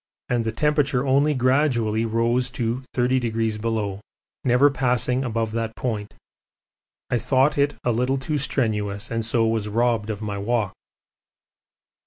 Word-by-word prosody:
and 120 -2 +1
the 110 - -1
temperature 145 -1 +1
only 140 +3 +3
gradually 125 -4 +2
rose 115 +2 +1
to 120 +1 -2
30°, 115 -4 0 0.4
never 130 +3 +4
passing 125 -1 +1
above 115 -2 -1
that 115 0 -3
point. 105 -4 -4 1.0
I 125 - +2
thought 135 +4 +2
it 145 0 +1
a 120 - +1
little 125 +4 +1
too 150 +2 -2
strenuous 105 -7 -1
and 115 0 -1
so 115 +1 +1
was 110 -2 0
robbed 115 0 +1
of 110 0 -4
my 100 -1 -3
walk. 110 -1 0
120 Hz, 135 wpm, -23 LUFS, 110-130 Hz, 1.0 s, never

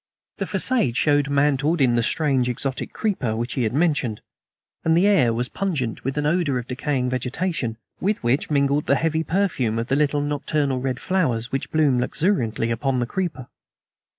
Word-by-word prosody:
The - - -2
facade 225 - +1
showed 145 -1 +2
mantled 145 +3 +2
in 130 -3 +4
the 120 - +3
strange 130 +1 +1
exotic 135 +1 -3
creeper 160 - -1
which 120 +2 -3
he 130 - -1
had 110 -1 0
mentioned, 145 -9 +1 0.6
and 160 0 +3
the 180 - +4
air 195 - +4
was 120 +2 -1
pungent 150 - -3
with 135 +2 -3
an 150 - 0
odor 155 -4 +1
of 125 - -4
decaying 130 -1 -1
vegetation, 130 -1 -2 0.2
with 205 -3 -1
which 120 +5 +1
mingled 140 0 +1
the 140 - +4
heavy 160 +2 0
perfume 160 - 0
of 115 +2 -3
the 135 - +2
little 145 0 +1
nocturnal 145 -2 -1
red 130 -1 -2
flowers 125 -12 0
which 135 - -2
bloomed 145 -6 +2
luxuriantly 120 - 0
upon 130 +3 0
the 120 - 0
creeper. 170 -3 -3
140 Hz, 180 wpm, -23 LUFS, 125-155 Hz, 0.6 s, in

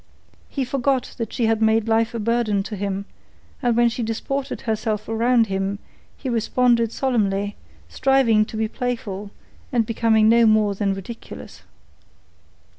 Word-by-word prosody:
He 270 -3 -2
forgot 260 0 0
that 230 -2 -3
she 235 - 0
had 225 0 +1
made 220 0 +3
life 225 +1 +1
a - - -2
burden 220 -2 +1
to 210 - -6
him, 200 0 -3 0.6
and 240 -3 +1
when 240 0 +5
she 235 +1 -2
disported 260 +5 -3
herself 220 -2 -2
around 230 +1 +3
him 195 0 -2 0.4
he 270 - -7
responded 235 0 +2
solemnly, 205 -6 0 0.3
striving 260 -5 +3
to 220 - -8
be 220 0 0
playful 215 -4 -4 0.4
and 235 -4 +2
becoming 220 -1 +3
no 230 0 +5
more 215 -1 +3
than 195 0 -1
ridiculous. 195 +5 -9
225 Hz, 145 wpm, -22 LUFS, 210-240 Hz, 0.6 s, when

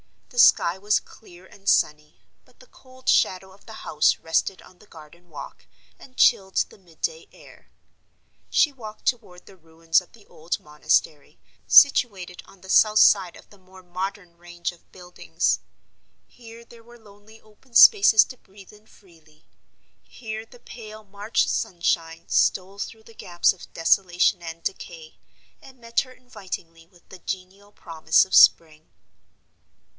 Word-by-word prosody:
The 245 - -6
sky 175 -6 +4
was 210 +1 +1
clear 180 -4 -18
and 195 +1 -6
sunny; 150 0 0 0.2
but - - -28
the - - -18
cold 255 0 -21
shadow 190 +1 +1
of 195 - -21
the 220 - -11
house 150 -1 +1
rested 165 +3 -2
on 180 - -20
the 210 - -21
garden 170 +2 -17
walk 155 - -12 0.3
and 255 -1 -18
chilled 190 -1 +2
the - - -18
midday 195 - -7
air. - - -19 0.8
She 295 - +2
walked 220 -5 -12
toward 215 -8 -4
the 195 - -18
ruins 165 0 -1
of 180 - -22
the 220 -3 -20
old 165 +2 -6
monastery, 150 0 -2 0.3
situated 195 -10 +4
on 195 - -20
the 190 - -15
south 215 +2 +4
side 190 -5 +4
of - - -18
the 205 - -20
more 185 0 -18
modern 180 0 -7
range 175 0 -6
of 175 - -23
buildings. 180 -1 -3 0.7
Here 230 -1 -15
there 235 0 -17
were 240 +1 -18
lonely 215 0 -19
open 220 +3 -25
spaces 390 - +7
to 255 - -13
breathe 195 -1 -18
in 210 +1 -21
freely; 160 -7 -24 0.6
here 220 -2 -9
the 245 - -18
pale 215 -3 -12
March 205 +2 -2
sunshine 165 -2 -3
stole 195 +1 0
through 220 +1 -8
the 230 - -18
gaps 175 -5 0
of 180 - -16
desolation 175 +2 +1
and 165 0 -9
decay, 165 -4 -8 0.4
and 265 -1 -17
met 230 -1 -2
her 255 - -4
invitingly 180 -9 -10
with 175 -1 -26
the 190 - -13
genial 190 +3 -8
promise 160 -4 0
of 190 - -15
spring. 155 -1 +4
190 Hz, 155 wpm, -23 LUFS, 170-220 Hz, 0.8 s, spaces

